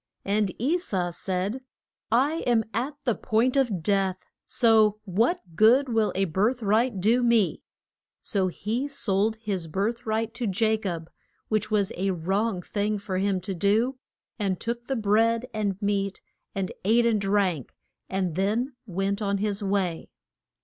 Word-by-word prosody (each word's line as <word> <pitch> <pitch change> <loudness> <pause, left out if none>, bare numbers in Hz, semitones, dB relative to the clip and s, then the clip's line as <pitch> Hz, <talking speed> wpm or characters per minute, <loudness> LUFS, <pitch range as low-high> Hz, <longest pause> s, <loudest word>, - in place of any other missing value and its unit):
And 200 -1 +1
E 300 +10 +1
sau 185 - -1
said, 190 +7 -3 0.5
I 275 +7 +3
am 235 -2 +3
at 255 +7 -2
the 245 -3 +2
point 235 +4 +1
of 230 -11 +1
death, 195 -1 0 0.2
so 220 -3 +4
what 225 - +1 0.2
good 245 - +5
will 225 -2 +2
a 195 +1 +2
birth 215 +8 0
right 215 +1 +2
do 225 +6 +3
me? 235 -5 +2 0.6
So 195 -3 0
he 220 +9 -2
sold 220 -6 +1
his 200 -6 -4
birth 210 +8 -2
right 220 +1 -1
to 240 -1 -3
Ja 220 +3 +2
cob 175 -6 -5 0.4
which 215 -1 0
was 205 -3 +1
a 195 +2 -1
wrong 190 +3 -1
thing 210 +2 -1
for 190 -2 -3
him 195 -1 +1
to 190 +2 -4
do 220 +8 +1 0.4
and 195 -3 -1
took 235 +1 -4
the 270 - -1
bread 225 +2 +2
and 205 -3 -1
meat, 200 -1 0 0.4
and 195 -1 -2
ate 230 +4 +4
and 220 -3 +2
drank, 195 - 0 0.4
and 190 -3 -1
then 215 - 0
went 195 +2 -1
on 200 -1 0
his 205 0 -1
way. 190 -4 -1
210 Hz, 155 wpm, -26 LUFS, 195-230 Hz, 0.6 s, good